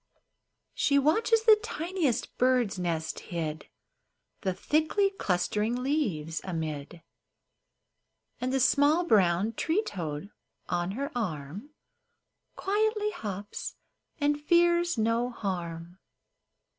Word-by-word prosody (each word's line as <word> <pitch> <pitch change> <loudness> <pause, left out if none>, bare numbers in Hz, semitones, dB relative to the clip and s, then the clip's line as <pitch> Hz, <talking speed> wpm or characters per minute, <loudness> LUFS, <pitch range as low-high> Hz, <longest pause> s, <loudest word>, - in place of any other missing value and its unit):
She 280 - +2
watches 435 +11 +3
the 435 -2 +7
tiniest 350 - -2
bird's 250 -6 +2
nest 165 -3 -2
hid 160 -3 -4 0.7
The 190 - 0
thickly 315 - +1
clustering 210 - -1
leaves 180 - -1
amid; 160 -2 -5 1.4
And 250 +1 -1
the 270 - +1
small 290 +6 +4
brown 200 - +3
tree 345 - 0
toad 170 - -5 0.4
on 175 +1 -1
her 280 +6 -3
arm 180 - -4 0.9
Quietly 425 +1 0
hops, 205 - -6 0.4
and 295 0 +1
fears 345 0 +3
no 230 +2 +1
harm. 175 -5 -5
230 Hz, 95 wpm, -29 LUFS, -, 1.4 s, the